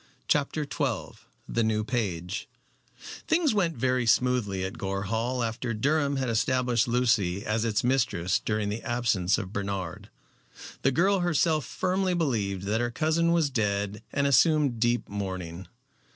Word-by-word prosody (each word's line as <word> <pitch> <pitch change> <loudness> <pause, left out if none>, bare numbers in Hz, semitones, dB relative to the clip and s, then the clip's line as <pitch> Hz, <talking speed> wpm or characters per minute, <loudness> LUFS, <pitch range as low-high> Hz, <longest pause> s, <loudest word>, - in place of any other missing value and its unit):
CHAPTER 150 +1 +1
XII 130 -3 -3 0.3
THE 115 - 0
NEW 110 -1 +1
PAGE 100 -5 -3 0.8
Things 320 -5 +3
went 175 -8 0
very 125 0 +1
smoothly 115 -6 +2
at 95 - -6
Gore 95 0 -2
Hall 115 +5 -1
after 115 +1 -3
Durham 140 +4 +1
had 135 -1 -1
established 120 +1 +1
Lucy 110 -6 +1
as 110 +1 0
its 110 -2 0
mistress 120 -9 +1
during 105 -1 -1
the 105 +3 -3
absence 110 -7 +1
of 95 +1 -6
Bernard. 100 -4 -4 0.7
The 135 - +3
girl 190 +8 +3
herself 165 -3 +1
firmly 185 0 0
believed 105 - -1
that 105 +4 0
her 120 - 0
cousin 160 +5 +1
was 165 -4 +2
dead 105 -2 -1
and 140 0 0
assumed 140 -2 +3
deep 120 +1 +1
mourning. 95 -3 -5
120 Hz, 145 wpm, -27 LUFS, 100-140 Hz, 0.8 s, Things